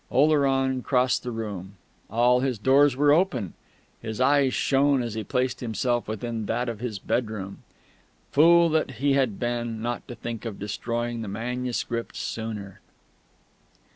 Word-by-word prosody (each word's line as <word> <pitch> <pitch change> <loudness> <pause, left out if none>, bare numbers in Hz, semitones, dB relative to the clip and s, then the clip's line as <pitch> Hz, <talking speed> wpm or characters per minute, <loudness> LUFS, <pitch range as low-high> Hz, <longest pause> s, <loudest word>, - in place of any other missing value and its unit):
Oleron 135 -3 +2
crossed 125 -1 +2
the 125 - -5
room. 100 -4 -6 0.3
All 120 +3 +3
his 130 -2 -1
doors 135 +4 +4
were 145 +2 +4
open; 150 - +1 0.5
his 110 0 -5
eyes 140 0 +4
shone 135 0 +2
as 115 -2 -4
he 110 0 -3
placed 125 +4 -1
himself 120 +1 -1
within 110 0 -4
that 120 +2 -1
of 115 -3 -4
his 115 -3 -4
bedroom. 105 -2 -3 0.7
Fool 170 +3 +6
that 155 -3 0
he 140 +4 +1
had 130 -7 +1
been, 120 -2 -2
not 120 +1 -4
to 120 - -7
think 115 -2 -6
of 115 -4 -5
destroying 115 +3 -3
the 110 - -5
manuscript 120 +2 -3
sooner!... 105 -4 -5
120 Hz, 145 wpm, -25 LUFS, 110-135 Hz, 0.7 s, Fool